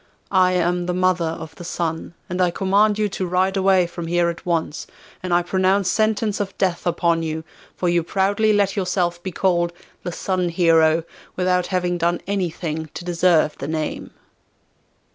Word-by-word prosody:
I 185 Hz, -1 st, +4 dB
am 175 Hz, 0 st, 0 dB
the 180 Hz, -, -1 dB
mother 185 Hz, -2 st, +2 dB
of 160 Hz, 0 st, -6 dB
the -, -, -8 dB
Sun, 170 Hz, 0 st, -3 dB
and 180 Hz, +1 st, -2 dB
I 180 Hz, -, +4 dB
command 200 Hz, +4 st, +2 dB
you 215 Hz, -1 st, +1 dB
to 190 Hz, -1 st, -3 dB
ride 185 Hz, +2 st, +1 dB
away 190 Hz, -1 st, +3 dB
from 170 Hz, -1 st, -6 dB
here 175 Hz, 0 st, +2 dB
at 170 Hz, +1 st, -7 dB
once, 165 Hz, -3 st, -1 dB, 0.3 s
and 185 Hz, -, -4 dB
I 175 Hz, 0 st, +3 dB
pronounce 185 Hz, +1 st, +1 dB
sentence 215 Hz, -1 st, +1 dB
of 195 Hz, -2 st, -4 dB
death 180 Hz, -2 st, 0 dB
upon 170 Hz, -1 st, +1 dB
you, 160 Hz, 0 st, -3 dB, 0.3 s
for 180 Hz, -, -2 dB
you 175 Hz, 0 st, +3 dB
proudly 200 Hz, +5 st, +1 dB
let 200 Hz, -2 st, +2 dB
yourself 180 Hz, -3 st, -1 dB
be 185 Hz, -, -5 dB
called 175 Hz, -2 st, +1 dB, 0.3 s
the 175 Hz, -, -4 dB
Sun 180 Hz, +1 st, -1 dB
Hero 165 Hz, -2 st, +3 dB, 0.3 s
without 180 Hz, -1 st, +1 dB
having 180 Hz, -1 st, -1 dB
done 170 Hz, +1 st, +1 dB
anything 165 Hz, -5 st, -3 dB
to 175 Hz, -, -7 dB
deserve 170 Hz, -3 st, +2 dB
the 140 Hz, -, -4 dB
name. 155 Hz, 0 st, -3 dB
180 Hz, 175 wpm, -21 LUFS, 170-190 Hz, 0.3 s, I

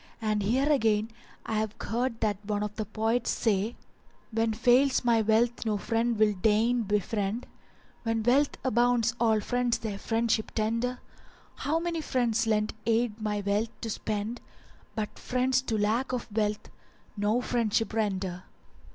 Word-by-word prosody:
And 215 Hz, -2 st, 0 dB
here 250 Hz, +8 st, +1 dB
again 225 Hz, -6 st, +2 dB, 0.3 s
I 220 Hz, -, -1 dB
have 220 Hz, -1 st, -2 dB
heard 235 Hz, 0 st, -2 dB
that 210 Hz, -2 st, 0 dB
one 210 Hz, -1 st, 0 dB
of 210 Hz, 0 st, -4 dB
the 215 Hz, -, -3 dB
poets 225 Hz, +3 st, 0 dB
said:— 220 Hz, 0 st, 0 dB, 0.6 s
When 225 Hz, 0 st, +1 dB
fails 250 Hz, +5 st, +3 dB
my 230 Hz, -2 st, +4 dB
wealth 225 Hz, +3 st, +2 dB
no 215 Hz, -2 st, 0 dB
friend 230 Hz, +2 st, 0 dB
will 210 Hz, -1 st, +4 dB
deign 220 Hz, +5 st, +2 dB
befriend: 210 Hz, +1 st, -1 dB, 0.3 s
* -, -, -31 dB
When 225 Hz, -1 st, -1 dB
wealth 270 Hz, +5 st, +3 dB
abounds 240 Hz, -1 st, +2 dB
all 225 Hz, -2 st, +3 dB
friends 245 Hz, +2 st, 0 dB
their 210 Hz, -3 st, -5 dB
friendship 225 Hz, 0 st, 0 dB
tender: 230 Hz, +3 st, 0 dB, 0.6 s
How 310 Hz, +3 st, 0 dB
many 335 Hz, -1 st, -2 dB
friends 235 Hz, -5 st, 0 dB
lent 215 Hz, -1 st, +1 dB
aid 230 Hz, -1 st, +1 dB
my 210 Hz, -1 st, -1 dB
wealth 205 Hz, +3 st, +1 dB
to 225 Hz, -, -3 dB
spend; 215 Hz, +3 st, -3 dB, 0.3 s
* -, -, -28 dB
But 215 Hz, -1 st, -4 dB
friends 255 Hz, +1 st, +1 dB
to 230 Hz, -4 st, -2 dB
lack 225 Hz, +6 st, 0 dB
of 245 Hz, -, -2 dB
wealth 210 Hz, -1 st, -1 dB, 0.5 s
no 210 Hz, +3 st, +1 dB
friendship 230 Hz, -3 st, 0 dB
render. 190 Hz, -4 st, -2 dB
225 Hz, 155 wpm, -28 LUFS, 210-240 Hz, 0.6 s, my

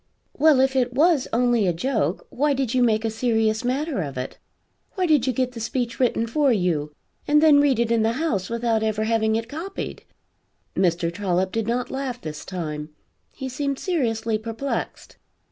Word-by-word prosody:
"Well 300 Hz, -2 st, +5 dB
if 265 Hz, 0 st, +2 dB
it 250 Hz, -1 st, +1 dB
was 305 Hz, 0 st, +3 dB
only 240 Hz, -3 st, +2 dB
a 175 Hz, -, +2 dB
joke, 265 Hz, -, -1 dB
why 290 Hz, +2 st, +1 dB
did 265 Hz, -3 st, -1 dB
you 255 Hz, -, +2 dB
make 225 Hz, -2 st, +2 dB
a 225 Hz, -, 0 dB
serious 220 Hz, -1 st, +1 dB
matter 270 Hz, 0 st, -1 dB
of 140 Hz, -5 st, -5 dB
it? 130 Hz, +1 st, -5 dB, 0.6 s
Why 375 Hz, -2 st, +1 dB
did 300 Hz, -6 st, +3 dB
you -, -, +3 dB
get 255 Hz, +1 st, -1 dB
the 240 Hz, -, -8 dB
speech 240 Hz, +1 st, -3 dB
written 240 Hz, -3 st, +2 dB
for 275 Hz, +4 st, +2 dB
you, 175 Hz, -8 st, 0 dB, 0.4 s
and 295 Hz, +1 st, +5 dB
then 300 Hz, -2 st, +6 dB
read 280 Hz, -4 st, +3 dB
it 235 Hz, 0 st, +1 dB
in 230 Hz, -1 st, +3 dB
the 225 Hz, +1 st, +2 dB
House 235 Hz, -, -1 dB
without 230 Hz, -1 st, 0 dB
ever 215 Hz, -1 st, 0 dB
having 220 Hz, 0 st, +1 dB
it 230 Hz, 0 st, -2 dB
copied?" 330 Hz, +9 st, -6 dB, 0.7 s
Mr. 170 Hz, -2 st, +1 dB
Trollop 185 Hz, -1 st, 0 dB
did 225 Hz, -1 st, -2 dB
not 245 Hz, +1 st, -1 dB
laugh 265 Hz, -2 st, -3 dB
this 155 Hz, -8 st, -7 dB
time; 155 Hz, -4 st, -5 dB, 0.4 s
he 265 Hz, -, -6 dB
seemed 275 Hz, +1 st, -2 dB
seriously 230 Hz, -, -1 dB
perplexed. 225 Hz, +5 st, -5 dB
235 Hz, 185 wpm, -23 LUFS, 215-270 Hz, 0.7 s, then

